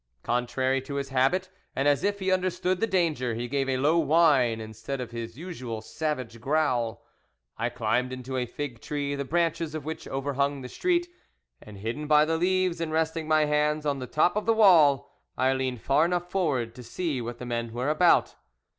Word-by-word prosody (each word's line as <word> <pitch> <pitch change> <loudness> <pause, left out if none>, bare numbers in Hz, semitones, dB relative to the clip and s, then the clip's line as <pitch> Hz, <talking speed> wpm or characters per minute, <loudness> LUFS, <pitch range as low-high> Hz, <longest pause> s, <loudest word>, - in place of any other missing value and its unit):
Contrary 130 +2 0
to 140 +2 -7
his 140 -1 -3
habit, 135 +9 +2 0.3
and 135 +2 +1
as 145 -1 +3
if 205 0 +1
he 190 -1 -1
understood 185 0 0
the 225 - +1
danger, 160 - 0
he 120 +1 -3
gave 135 +1 -1
a 130 - +1
low 150 +6 +3
whine 145 -7 +4
instead 110 +5 -6
of 125 -2 -5
his 115 0 -6
usual 130 -10 -6
savage 125 -1 -4
growl. 130 -6 0 0.5
I 115 +1 -1
climbed 120 +1 -1
into 130 +1 -6
a 125 -1 -1
fig 130 -3 -6
tree 145 -1 -3
the 140 0 -3
branches 165 0 0
of 155 -3 -5
which 160 +1 -6
overhung 140 +1 -1
the 125 - -7
street, 350 - 0 0.5
and, 105 -2 -12
hidden 115 +9 -4
by 150 0 +5
the 160 +1 0
leaves, 185 0 +1
and 165 -1 -2
resting 160 0 -1
my 155 -1 +4
hands 150 +1 +1
on 140 -2 0
the 125 - -5
top 155 +8 +2
of 210 +1 -2
the 225 - +4
wall, 165 -10 +5 0.3
I 130 +1 +3
leaned 130 -3 -2
far 140 +3 +3
enough 175 0 -2
forward 135 -12 0
to 125 - -11
see 140 +3 -3
what 120 +1 -5
the 125 - -7
men 120 -1 -3
were 125 +5 -2
about. 165 +3 +4
140 Hz, 200 wpm, -27 LUFS, 125-165 Hz, 0.5 s, by